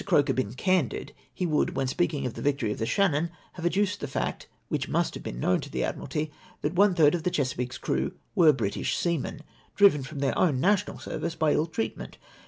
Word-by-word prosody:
Croker 170 -7 +3
been 120 -3 -2
candid, 185 -3 0 0.2
he 155 +9 -3
would, 155 -3 +1
when 135 - 0
speaking 145 +1 0
of 125 - -2
the - - -7
victory 140 -7 0
of - - -4
the 115 - -1
Shannon, 170 - +2 0.2
have 175 -1 -2
ad - - 0
duced 205 +1 +1
the 145 - -4
fact, 135 - -3 0.2
which - - -2
must - - +1
have - - -7
been - - -6
known 90 +7 +2
to - - -8
the - - -2
Admiralty 150 0 -3 0.3
that 150 - -1
one 195 0 +4
thkd 150 -4 +5
of 175 - 0
the 180 - 0
Chesapeake's 130 -4 -2
crew - - -1 0.2
were 170 -6 +7
British 115 -8 -1
seamen, 165 -3 -1 0.3
driven 200 -8 +6
from 140 +3 -8
then" 140 -1 +1
own 150 -8 +2
national 200 +5 +2
service 165 0 -4
by 155 -2 +2
ill 155 - +1
treatment. 110 -9 -4
150 Hz, 215 wpm, -27 LUFS, 130-175 Hz, 0.3 s, were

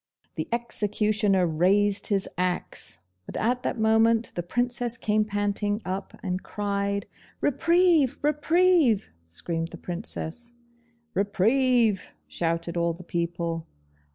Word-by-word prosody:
The - - -4
executioner 210 -4 +1
raised 195 +5 +2
his 200 -2 0
axe, 180 - -3 0.3
but - - -6
at 245 +3 +1
that - - -2
moment 225 +1 +3
the 175 - -2
Princess 245 +5 -1
came 215 -2 +1
panting 205 0 -1
up 190 +1 -4
and 185 -1 -2
cried 200 -1 -2 0.3
'Reprieve!' 335 -1 +3
'Reprieve!' 305 - +3 0.2
screamed 165 - -3
the - - -10
Princess. 195 +4 -6 0.6
'Reprieve!' 220 +1 +2
shouted 170 0 -2
all 170 0 +1
the 175 +2 -11
people. 170 -1 -3
205 Hz, 110 wpm, -26 LUFS, 180-235 Hz, 0.6 s, moment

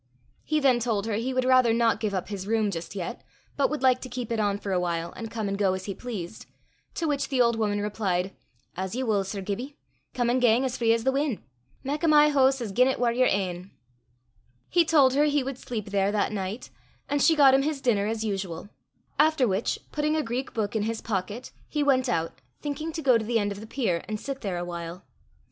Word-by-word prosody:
He 310 0 +1
then 265 -4 +4
told 220 -4 -1
her 225 - -2
he 230 +5 -1
would 255 0 0
rather 255 -2 +5
not 230 -2 +2
give 210 -3 -1
up 185 - -3
his 195 -2 -5
room 220 -2 +1
just 170 +2 -6
yet, 195 +6 -5 0.3
but 280 - +2
would 300 -3 -3
like 255 -1 +4
to 255 - -7
keep 245 -2 -5
it 230 - 0
on 205 -1 +1
for 205 -1 -5
a 185 - +2
while, 170 -1 -2
and 225 -1 -7
come 220 -2 -3
and 195 - -1
go 195 -2 +3
as 190 0 -6
he 200 - -3
pleased; 215 -5 -7 0.5
to 330 - -1
which 285 -2 -1
the 265 -3 0
old 235 -1 +4
woman 210 -2 0
replied, 195 -3 -1 0.4
"As 190 +3 -4
ye 260 - -1
wull, 210 -5 +1
Sir 195 +1 -5
Gibbie. 240 +9 -5 0.4
Come 245 -2 +1
an' 255 - +2
gang 245 +1 +4
as 255 -1 -2
free 230 -1 +2
as 230 0 +2
the 265 - +3
win'. 275 -4 -1 0.4
Mak 290 +4 -3
o' - - +3
my 300 -1 +6
hoose 270 -2 +3
as 220 -4 -3
gien 250 +6 +4
it 265 - 0
war 240 -1 +2
yer 255 +2 +3
ain." 185 -1 -1 1.0
He 350 -1 +4
told 285 -5 +5
her 290 +2 +4
he 290 -2 +2
would 265 -1 -5
sleep 215 -4 -5
there 200 0 +2
that 210 +1 0
night, 200 +2 -5 0.4
and 285 0 0
she 325 - +5
got 275 -3 +7
him 270 - +5
his 295 0 -1
dinner 210 -6 +1
as 220 0 -2
usual; 195 -3 -4 0.5
after 305 -4 +4
which, 195 +2 0
putting 300 +1 0
a 310 - +1
Greek 250 +2 -3
book 215 -1 -2
in 220 - +1
his 225 +1 -2
pocket, 210 +3 -4 0.2
he 300 -1 0
went 260 -3 +2
out, 165 -6 -2 0.2
thinking 300 +3 -4
to 320 - -4
go 250 -4 +5
to - - -4
the 230 +2 0
end 205 -2 0
of 200 - -6
the 220 - -9
pier 210 -10 -1
and 215 -1 -3
sit 275 +3 -5
there 190 -5 -2
a 175 - -3
while. 170 +1 -7
230 Hz, 240 wpm, -26 LUFS, 200-265 Hz, 1.0 s, got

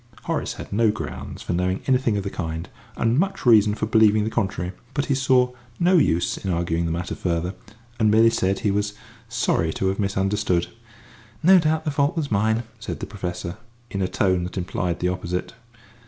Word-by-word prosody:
Horace - - -2
had - - -8
no 110 +1 +3
grounds 105 - -5
for - - -2
knowing 90 +2 0
anything 125 -5 +2
of 100 - -2
the 100 - -4
kind, 80 -2 -4 0.3
and 115 +4 +2
much 195 -3 -1
reason 105 -3 +6
for 110 - -2
believing 110 -1 +4
the 110 - -2
contrary, 95 -5 -1 0.2
but 145 -1 0
he 140 - +1
saw 130 -1 +3 0.3
no 180 +1 +4
use 85 - +2
in 95 - -4
arguing 85 -1 0
the - - -2
matter 85 +2 -3
further, 85 +1 -2 0.5
and 110 -2 +4
merely 110 +2 +5
said 95 -4 0
he 105 - +1
was 105 +1 -1 0.3
sorry 80 -7 +1
to 95 - 0
have 95 - -3
misunderstood. 95 -2 +1 0.8
"No 185 +2 +8
doubt 160 0 0
the 150 - 0
fault 145 +3 +1
was 145 -5 -2
mine," 110 +3 +2 0.2
said - - -5
the - - -4
Professor, 90 -3 -5 0.3
in 100 - -2
a 95 - +1
tone 95 -2 +1
that 90 - -7
implied 90 -1 -2
the 90 - +2
opposite. 90 +1 -3
105 Hz, 195 wpm, -23 LUFS, 90-115 Hz, 0.8 s, No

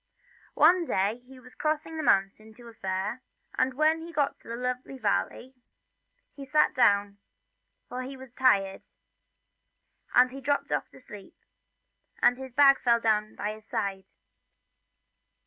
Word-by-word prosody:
One 345 +3 +5
day 200 -3 0
he 255 +1 -16
was 250 0 -16
crossing 310 +1 -2
the 315 - -3
mountains 215 -2 0
to 240 -1 -14
a 230 - -12
fair, 195 +4 -4 0.3
and 255 0 0
when 310 +3 +2
he 335 +1 -9
got 290 -4 0
to - - -12
a 235 - -4
lonely 250 +2 -4
valley 240 +3 -2 0.8
he 280 - -10
sat 300 +3 +2
down, 200 -4 +2 0.7
for 250 +1 -5
he 265 +1 -7
was 260 -2 -13
tired, 200 -7 +2 1.3
and 250 +1 +5
he 270 +1 -9
dropped 285 +1 -1
off - - -1
to - - -16
sleep, 205 -6 -13 0.8
and 245 +1 +3
his 260 -2 -9
bag 275 -1 +6
fell 235 -1 +3
down 215 -2 0
by 210 +1 -3
his 215 0 -15
side. 200 -4 -3
250 Hz, 150 wpm, -27 LUFS, 210-270 Hz, 1.3 s, bag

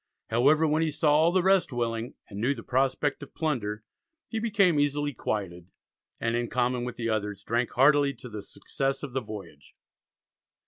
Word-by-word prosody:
However, 145 +8 +4
when 155 +1 +2
he 160 - +1
saw 150 0 +2
all 160 +3 +4
the 185 0 +2
rest 190 -4 +3
willing, 120 -1 -2
and 100 -1 -7
knew 135 +5 +1
the 115 - -9
prospect 135 +3 0
of 145 - -11
plunder, 110 -9 -2 0.5
he 225 - -2
became 200 -8 +3
"easily 145 0 0
quieted," 95 -6 -4 0.5
and 115 0 0
in 120 0 -1
common 125 0 0
with 125 - -5
the 115 -1 -2
others 105 -2 -2
drank 120 +3 0
heartily 140 +1 +4
to 125 - -10
the 110 -3 -7
success 135 +6 -3
of 140 -4 -6
the 130 - 0
voyage. 105 -10 -10
125 Hz, 180 wpm, -27 LUFS, 115-150 Hz, 0.5 s, However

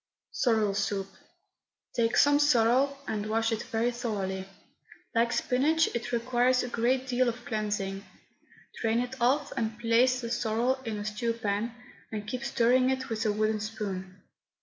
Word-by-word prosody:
SORREL 220 -5 +2
SOUP. 200 -1 -1 0.9
Take 230 -1 +1
some 290 0 +5
sorrel 270 0 +3
and 215 -1 -2
wash 225 +1 +1
it 225 0 -1
very 230 +2 -1
thoroughly. 200 -6 -3 0.7
Like 235 0 +2
spinach, 305 +8 +2
it 235 0 -3
requires 250 +1 +2
a 250 - -4
great 250 +3 +1
deal 255 -1 +2
of 235 +1 -7
cleansing. 205 -3 -2 0.8
Drain 225 0 +1
it 250 +1 -4
off 275 +5 +2
and 225 -3 -2
place 240 +2 +3
the 235 -1 -5
sorrel 240 +3 0
in 220 -2 -3
a 205 - -5
stew 220 +2 -1
pan, 225 +1 -2 0.4
and 210 -1 -5
keep 255 +4 -4
stirring 255 0 +3
it 265 0 -2
with 225 0 -1
a - - +3
wooden 215 +1 0
spoon. 195 -3 -5
230 Hz, 155 wpm, -29 LUFS, 215-250 Hz, 0.9 s, some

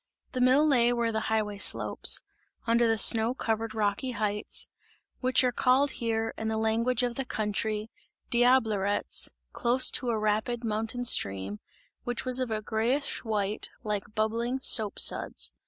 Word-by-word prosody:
The 255 - -3
mill 260 +4 +4
lay 245 -5 +3
where 235 -1 -1
the 220 - -2
highway 210 -2 -2
slopes - - +3 0.4
under 235 0 +2
the 225 0 +1
snow 225 +3 +5
covered 225 -2 -3
rocky 215 +4 -2
heights 210 -1 -2 0.5
which 255 0 +2
are 250 - +1
called 260 +3 +1
here, 225 -1 -3
in 220 - -4
the 220 0 -2
language 230 +3 0
of 245 -1 -1
the 270 - -4
country 215 -1 -3 0.4
"Diablerets" 225 -5 +2 0.2
close 245 +2 +4
to 250 - -3
a 230 - -1
rapid 215 +3 -2
mountain 225 +2 -4
stream, 100 - +1 0.4
which 245 0 -4
was 255 0 +2
of 255 -2 -3
a 215 -1 -4
greyish 235 +7 -1
white, 210 -2 -2
like 210 -1 -5
bubbling 230 +4 -2
soap 220 -5 +3
suds. - - +3
225 Hz, 155 wpm, -27 LUFS, 215-245 Hz, 0.5 s, snow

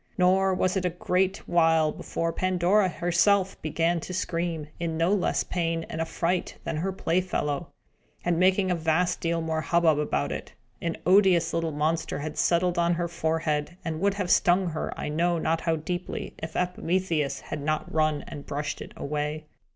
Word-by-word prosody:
Nor 190 +1 +3
was 185 +1 +1
it 190 - 0
a 180 - +2
great 185 +2 -1
while 165 -2 +3
before 165 +2 -3
Pandora 185 +2 +2
herself 185 +3 +2
began 165 +2 0
to 185 +3 -6
scream, 170 -3 -2
in 165 -1 -2
no 170 +4 +2
less 200 - +1
pain 165 -2 -2
and 160 - -3
affright 170 +2 -1
than - - -3
her 185 +5 -1
playfellow, 175 -4 -1 0.6
and 170 -1 +1
making 185 +1 +3
a - - +2
vast 170 +2 +1
deal 165 0 0
more 160 -1 -1
hubbub 165 -2 +3
about 70 - -1
it. - - -6 0.3
An 170 -1 -2
odious 185 -3 +4
little 165 -1 0
monster 155 +2 -1
had 150 +1 -5
settled 175 +1 +2
on 170 0 +3
her 175 0 -1
forehead, 160 -1 -1
and 160 -1 -2
would 200 0 +2
have 185 -3 -1
stung 180 +1 +4
her 160 - -3
I - - -3
know 170 +3 +1
not 165 0 0
how 165 -1 +1
deeply, 175 +3 -4
if 160 0 -6
Epimetheus 180 -4 0
had 150 - -6
not 155 +2 -2
run 155 -2 +1
and 145 - -7
brushed 145 +1 -3
it - - -9
away. 150 +1 -3
170 Hz, 175 wpm, -27 LUFS, 160-180 Hz, 0.6 s, odious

